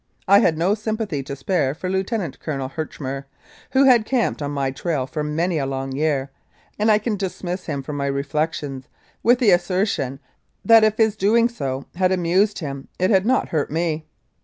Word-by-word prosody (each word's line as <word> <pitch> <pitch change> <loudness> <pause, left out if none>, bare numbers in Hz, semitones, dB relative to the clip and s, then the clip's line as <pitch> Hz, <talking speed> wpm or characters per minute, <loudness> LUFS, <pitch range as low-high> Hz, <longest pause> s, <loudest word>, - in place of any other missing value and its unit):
I 200 +1 +7
had 165 -7 +2
no 175 +5 +2
sympathy 215 -7 -2
to 140 +1 -6
spare 140 -1 0
for 185 - -5
Lieutenant 190 - -2
Col. 135 -4 -3
Herchmer, 135 -2 -5 0.4
who 270 +1 +4
had 250 -4 +6
camped 240 - 0
on 145 - -2
my 140 -2 -1
trail 140 -1 -2
for 150 +3 -4
many 160 +3 0
a 135 - -1
long 135 0 -3
year, 140 -1 -1 0.5
and 215 +1 +3
I 210 - +6
can 215 +1 -2
dismiss 185 -2 -4
him 140 -4 -3
from 145 +2 -5
my 140 0 -1
reflections 140 -1 -2 0.3
with 240 +2 +4
the 240 -5 +4
asser 180 +2 +2
tion, 135 - -3 0.5
that 225 -1 +7
if 215 0 +3
his 220 -2 +3
doing 225 +4 +3
so 135 - -4
had 185 +1 +1
amused 185 +3 +2
him 140 -4 -6
it 185 +3 +1
had 195 +1 +3
not 260 +1 +2
hurt 155 -3 -1
me. 160 0 -2
170 Hz, 190 wpm, -22 LUFS, 140-205 Hz, 0.5 s, I